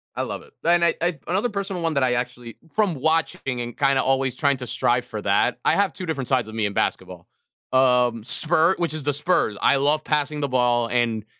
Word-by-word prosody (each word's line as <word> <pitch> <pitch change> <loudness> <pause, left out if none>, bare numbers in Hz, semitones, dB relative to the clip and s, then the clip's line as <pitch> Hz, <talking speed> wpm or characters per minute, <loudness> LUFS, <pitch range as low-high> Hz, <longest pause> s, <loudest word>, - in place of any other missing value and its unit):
I - - -2
love - - -5
it. 455 -1 -19
And 170 +1 +4
I 170 - +3
I 175 -3 -1
another 200 +7 0
personal 195 -3 -4
one 165 -1 0
that 140 - +2
I 125 -1 +2
actually 120 -1 -5 0.2
from 205 -6 +1
watching 140 -4 -1
and 120 0 -7
kinda 135 -2 +2
always 135 -1 0
trying 140 -2 +1
to 125 -1 -7
strive 120 +2 +1
for 110 -3 -6
that, 100 0 +1
I - - +4
have 200 -3 +1
2 185 - -7
different 140 -6 -3
sides 125 -4 +1
of 110 - -9
me 110 - 0
in 100 - -2
basketball. - - -3 0.5
Um, 125 -3 +3
spur 165 +7 +2
which 170 -3 -1
is 155 - -4
The 145 +1 0
Spurs. 145 - 0
I - - +4
love 145 +3 +1
passing 150 0 -1
the 145 - -1
ball 120 -2 +1
and 115 -3 0
135 Hz, 225 wpm, -23 LUFS, 120-165 Hz, 0.5 s, And